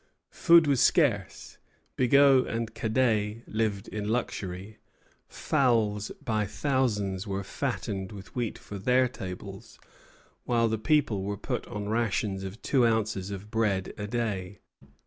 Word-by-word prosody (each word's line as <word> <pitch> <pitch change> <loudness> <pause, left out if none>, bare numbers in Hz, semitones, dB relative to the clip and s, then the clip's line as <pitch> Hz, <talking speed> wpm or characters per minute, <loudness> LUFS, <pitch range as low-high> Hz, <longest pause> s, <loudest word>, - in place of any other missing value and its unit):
Food 170 -1 +6
was 140 -4 +2
scarce. - - +1 0.4
Bigot 135 +1 +5
and 115 -1 -3
Cadet 110 -2 0
lived 105 -3 -1
in 105 -1 -4
luxury; 105 -3 -3 0.5
fowls 110 -6 +1 0.2
by 110 -2 0
thousands 105 -7 -1
were 100 0 -3
fattened 95 0 -3
with 100 -3 -11
wheat 120 -3 -2
for 100 - -9
their 125 +5 +3
tables, 95 -7 -8 0.7
while 115 -1 +2
the 110 -1 -1
people 115 -5 +2
were 100 +1 -3
put - - -4
on 105 0 -5
rations 110 -3 -1
of 95 +4 -8
two 130 -3 +3
ounces 110 -4 0
of 100 +1 -7
bread 100 -4 0
a 105 - -5
day. 100 -4 -3
110 Hz, 130 wpm, -28 LUFS, 100-120 Hz, 0.7 s, Food